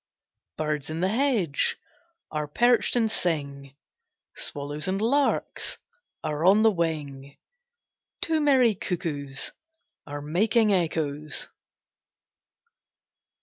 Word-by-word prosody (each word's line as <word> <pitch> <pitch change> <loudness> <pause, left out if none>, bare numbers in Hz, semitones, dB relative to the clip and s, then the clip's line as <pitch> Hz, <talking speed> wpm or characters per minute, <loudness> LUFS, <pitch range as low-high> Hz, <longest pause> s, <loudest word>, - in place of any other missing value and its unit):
Birds 150 -2 -2
in 160 +1 -4
the 185 - +2
hedge 220 - +1 0.5
Are 150 -1 -2
perched 240 +12 +3
and 225 -3 +2
sing; 140 -7 -2 0.6
Swallows 145 +2 -3
and 190 +1 0
larks 275 +6 0 0.5
Are 155 0 -2
on 200 +4 +6
the 225 - +6
wing: 145 -6 -3 0.8
Two 320 -1 +1
merry 260 -6 +4
cuckoos 155 -8 -3 0.6
Are 145 0 -6
making 210 +7 +2
echoes. 155 -4 -1
165 Hz, 95 wpm, -26 LUFS, 145-220 Hz, 0.8 s, on